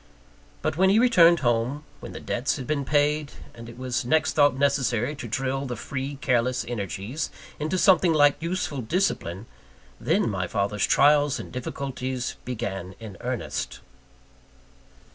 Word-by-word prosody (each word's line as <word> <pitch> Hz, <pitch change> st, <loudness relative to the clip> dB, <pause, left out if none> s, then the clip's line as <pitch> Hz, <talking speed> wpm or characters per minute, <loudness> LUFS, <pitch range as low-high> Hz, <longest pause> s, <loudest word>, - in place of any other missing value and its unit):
But 140 Hz, -, -1 dB
when 190 Hz, +1 st, +4 dB
he 200 Hz, -, +4 dB
returned 175 Hz, -9 st, +6 dB
home 120 Hz, +4 st, 0 dB, 0.2 s
when -, -, -9 dB
the -, -, -7 dB
debts 125 Hz, +3 st, -1 dB
had 135 Hz, -, -6 dB
been 145 Hz, +1 st, -1 dB
paid, 150 Hz, +1 st, +1 dB, 0.2 s
and 115 Hz, 0 st, -10 dB
it 120 Hz, -, -12 dB
was 125 Hz, -1 st, -2 dB
next 155 Hz, +6 st, +2 dB
thought 145 Hz, -3 st, +4 dB
necessary 135 Hz, -2 st, +1 dB
to 120 Hz, -, -6 dB
drill 135 Hz, +4 st, -2 dB
the 125 Hz, -, -4 dB
free, 135 Hz, +5 st, -5 dB
careless 125 Hz, 0 st, +1 dB
energies 110 Hz, -, -4 dB, 0.3 s
into 155 Hz, +5 st, -1 dB
something 185 Hz, -2 st, +5 dB
like 145 Hz, -1 st, +4 dB
useful 165 Hz, -5 st, -2 dB
discipline 110 Hz, -, -1 dB, 0.5 s
then -, -, +1 dB
my 95 Hz, -4 st, -2 dB
father's 100 Hz, +1 st, 0 dB
trials 145 Hz, 0 st, +4 dB
and -, -, -8 dB
difficulties 130 Hz, 0 st, -4 dB
began 95 Hz, -7 st, -4 dB
in 110 Hz, -4 st, -9 dB
earnest. 125 Hz, -1 st, -4 dB
130 Hz, 145 wpm, -25 LUFS, 120-150 Hz, 0.5 s, returned